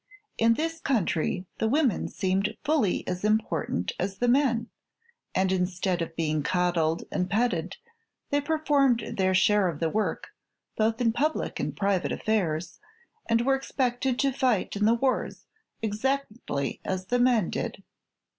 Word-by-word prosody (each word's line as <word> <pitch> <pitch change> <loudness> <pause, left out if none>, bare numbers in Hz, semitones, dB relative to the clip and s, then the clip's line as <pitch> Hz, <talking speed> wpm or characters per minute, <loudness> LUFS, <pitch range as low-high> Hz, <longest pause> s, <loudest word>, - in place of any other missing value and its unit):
In 230 0 +4
this 325 +4 -2
country 185 - 0
the 225 - +1
women 270 -1 +1
seemed 195 +2 -1
fully 295 - +1
as 180 +1 -3
important 210 - 0
as 195 +2 -2
the 245 - 0
men, 240 -3 +2 0.7
and 190 0 +2
instead 180 -1 0
of 165 0 -4
being 155 -2 0
coddled 165 0 +1
and 180 0 -1
petted 195 -5 0 0.5
they 285 0 +2
performed 285 -6 +2
their 190 -1 +2
share 205 +1 +4
of 160 -4 -3
the 165 -1 0
work, 215 0 -1 0.5
both 220 +1 +1
in 230 -2 +3
public 300 +6 -1
and - - -3
private 195 -2 +1
affairs, 175 -6 -1 0.5
and 230 0 +3
were 270 +3 +2
expected 260 -1 -1
to 275 0 +2
fight 255 -8 +1
in 210 +1 +1
the 225 +2 +5
wars 255 +2 -1 0.4
exactly 220 - -2
as 185 0 -3
the 245 +6 0
men 245 -7 +3
did. - - -4
215 Hz, 145 wpm, -27 LUFS, 180-250 Hz, 0.7 s, the